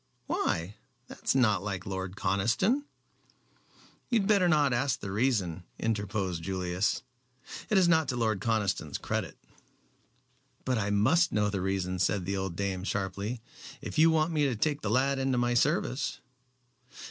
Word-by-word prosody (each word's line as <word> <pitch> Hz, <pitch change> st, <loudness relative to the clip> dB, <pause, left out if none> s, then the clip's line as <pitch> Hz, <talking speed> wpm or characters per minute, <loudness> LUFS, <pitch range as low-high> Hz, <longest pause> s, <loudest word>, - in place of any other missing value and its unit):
"Why? 85 Hz, +5 st, -1 dB, 0.3 s
That -, -, -12 dB
is -, -, +2 dB
not 110 Hz, -8 st, +3 dB
like 95 Hz, -3 st, -4 dB
Lord 95 Hz, -1 st, -4 dB
Conniston." 115 Hz, -, +1 dB, 1.2 s
"You 235 Hz, -3 st, +3 dB
had 195 Hz, -, -1 dB
better 200 Hz, -4 st, +4 dB
not 145 Hz, -5 st, +3 dB
ask 125 Hz, +2 st, 0 dB
the 100 Hz, -, -5 dB
reason," 100 Hz, -7 st, 0 dB
interposed 100 Hz, -5 st, -2 dB
Julius; 95 Hz, +3 st, -1 dB, 0.7 s
"it 215 Hz, -, +3 dB
is 185 Hz, -2 st, +5 dB
not 160 Hz, -3 st, +3 dB
to 130 Hz, -, -1 dB
Lord 110 Hz, -5 st, 0 dB
Conniston's 110 Hz, -4 st, 0 dB
credit." -, -, -3 dB, 1.3 s
"But 125 Hz, -3 st, +1 dB
I 100 Hz, -1 st, -1 dB
must 130 Hz, +13 st, +3 dB
know 105 Hz, -1 st, +1 dB
the 100 Hz, -2 st, -2 dB
reason," 95 Hz, -1 st, -1 dB
said 95 Hz, 0 st, +1 dB
the 100 Hz, +2 st, -1 dB
old 95 Hz, -3 st, -3 dB
dame, 95 Hz, -1 st, -2 dB
sharply, 100 Hz, +4 st, -3 dB, 0.4 s
"if -, -, -4 dB
you 160 Hz, +1 st, +7 dB
want 160 Hz, +1 st, +2 dB
me 150 Hz, -2 st, +2 dB
to 130 Hz, -4 st, 0 dB
take 145 Hz, +6 st, 0 dB
the 100 Hz, -, -2 dB
lad 135 Hz, +4 st, +2 dB
into 135 Hz, -1 st, +1 dB
my 120 Hz, 0 st, +1 dB
service." -, -, 0 dB
110 Hz, 160 wpm, -29 LUFS, 95-135 Hz, 1.3 s, you